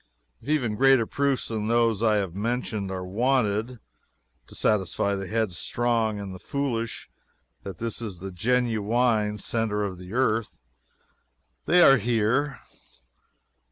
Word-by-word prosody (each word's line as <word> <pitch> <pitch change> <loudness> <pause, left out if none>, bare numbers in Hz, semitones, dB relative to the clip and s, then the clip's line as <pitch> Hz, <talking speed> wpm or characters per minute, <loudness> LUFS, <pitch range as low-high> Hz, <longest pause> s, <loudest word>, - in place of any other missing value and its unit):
If - - -10
even 125 -9 0
greater 135 -2 +5
proofs 140 +1 -1
than 110 -2 -2
those 115 -2 +2
I 110 -2 +3
have 95 -5 -1
mentioned 110 -1 -2
are 95 -1 -4
wanted, 115 +2 0 0.7
to - - -12
satisfy 100 -1 +1
the 95 -1 -4
headstrong 110 +1 0
and 100 -2 -6
the 95 - -9
foolish 115 -5 -3 0.5
that 95 -3 -8
this 115 +2 -4
is 105 -6 -5
the 95 +2 -7
genuine 110 0 +1
centre 105 0 -1
of 95 -3 -4
the 90 +2 -10
earth, 115 -3 0 1.1
they 175 0 +6
are 135 -3 +7
here. 120 +5 0
110 Hz, 130 wpm, -26 LUFS, 100-120 Hz, 1.1 s, are